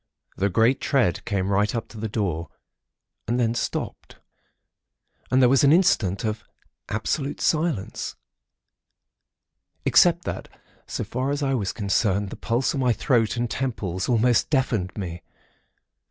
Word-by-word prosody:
The 100 +2 +1
great 115 +7 +2
tread 115 - +1
came 100 -3 -1
right 105 +3 +1
up 115 - -3
to 115 - -12
the 110 - -2
door 90 -6 -2 0.8
and 120 +3 0
then 115 -1 +2
stopped, 120 - -4 1.1
and 130 - +3
there - - +7
was 135 +3 +4
an 140 - +6
instant 125 - +3
of 110 0 -2 0.5
absolute 135 +7 -2
silence, 155 - -1 1.7
except 175 0 +5
that, - - -4 0.4
so - - -3
far 130 +3 -2
as 145 +1 -1
I 135 -1 +1
was 105 -7 -1
concerned, 100 -1 0
the - - -6
pulse 120 +3 0
in 140 - -2
my 125 -2 +3
throat 115 -3 +1
and 120 0 0
temples 105 -6 -3
almost 120 0 +3
deafened 120 - 0
me. 85 -4 -5
115 Hz, 140 wpm, -24 LUFS, 100-130 Hz, 1.7 s, there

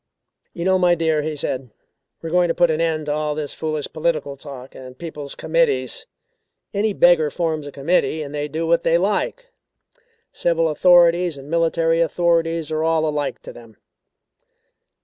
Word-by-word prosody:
"You 170 - -4
know, 190 0 +3
my 175 -1 +4
dear," 160 -2 +1
he 155 +1 -3
said; 130 -3 -3 0.5
"we 165 - -4
are - - -9
going 180 0 +3
to 165 - -1
put 175 -2 +3
an 155 +1 -1
end 160 -2 0
to 145 - -1
all 150 0 -2
this 150 -2 -4
foolish 155 -2 -3
political 155 -3 -1
talk 135 -2 -11
and 130 -1 -11
people's 150 -3 -7
committees. - - 0 0.7
Any 210 +2 +1
beggar 175 -5 +4
forms 155 -2 -2
a - - -7
committee, 155 +2 0
and 145 0 -8
they 145 0 -2
do 160 +3 -3
what 170 +1 +2
they 165 0 +3
like. 210 - -2 0.8
Civil 165 -1 +1
authorities 175 0 +4
and 140 +2 -11
military 165 0 +2
authorities 165 -1 +1
are 155 0 -1
all 160 -1 +2
alike 150 -2 -3
to - - -9
them." 115 -3 -15
160 Hz, 170 wpm, -21 LUFS, 150-170 Hz, 0.8 s, my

